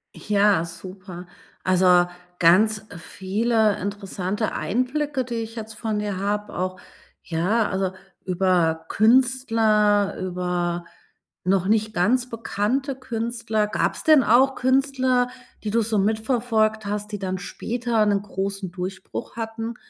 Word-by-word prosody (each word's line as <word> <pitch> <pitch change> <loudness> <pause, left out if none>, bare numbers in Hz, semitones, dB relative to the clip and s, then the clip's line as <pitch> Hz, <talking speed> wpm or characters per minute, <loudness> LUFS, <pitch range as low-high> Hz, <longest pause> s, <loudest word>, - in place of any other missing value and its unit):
Ja, 205 -4 +2
super. 185 +1 -9 0.4
Also, 180 -1 +5 0.3
ganz 210 +5 +4
viele 210 +5 0
interessante 200 +1 -3
Einblicke, 265 +3 -1
die 240 -1 -5
ich 225 0 -5
jetzt 220 -1 -6
von 215 -1 -2
dir 205 -2 -3
habe, 205 +2 -2
auch 185 0 -2 0.4
ja, 185 +7 0
also, 190 0 -1 0.3
über 175 -3 +1
Künstler, 220 -4 +3
über 180 -1 -2 0.6
noch 185 0 +2
nicht 215 0 +1
ganz 245 +7 +2
bekannte 235 +4 -2
Künstler. 230 -3 -2
Gab's 210 - -1
denn 310 -4 +6
auch 260 +4 +4
Künstler, 260 -1 +2 0.3
die 210 - -2
du 230 +2 +2
so 220 0 0
mitverfolgt 220 +1 +1
hast, 210 +1 -3
die 205 - -4
dann 185 -1 -3
später 230 +2 -1
'nen 200 -1 +2
großen 195 -2 -4
Durchbruch 185 +1 -6
hatten, 225 0 -4
210 Hz, 120 wpm, -23 LUFS, 190-230 Hz, 0.6 s, denn